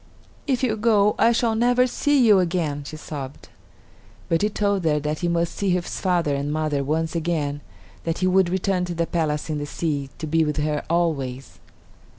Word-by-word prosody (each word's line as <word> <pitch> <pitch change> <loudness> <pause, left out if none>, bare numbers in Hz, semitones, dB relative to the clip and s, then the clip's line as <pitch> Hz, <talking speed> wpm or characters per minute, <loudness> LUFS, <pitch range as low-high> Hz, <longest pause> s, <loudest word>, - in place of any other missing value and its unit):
"If 265 -2 0
you 225 -4 +1
go, 210 -2 +3
I 230 - +5
shall 235 -1 +1
never 245 +2 +3
see 275 +1 +2
you 210 -4 +6
again," 165 -5 -1
she 155 - -7
sobbed. 140 -3 -8 0.8
But 165 - +2
he 210 - +2
told 200 -2 0
her 150 -2 +2
that 150 +1 -3
he 175 - -1
must 170 0 0
see 200 - -1
his 180 -1 -1
father 175 -6 +1
and 140 +1 -2
mother 155 -2 -1
once 160 +3 -1
again; 155 -4 -1 0.4
then 165 -1 -1
he 185 - 0
would 185 -1 +3
return 185 0 0
to 175 -1 -5
the 170 0 0
palace 155 -3 -1
in 155 -2 -2
the 145 - -4
sea, 145 -4 -2
to 160 - -5
be 160 +1 +2
with 150 -1 -2
her 150 0 -1
always. 140 -7 -1
170 Hz, 195 wpm, -23 LUFS, 150-195 Hz, 0.8 s, you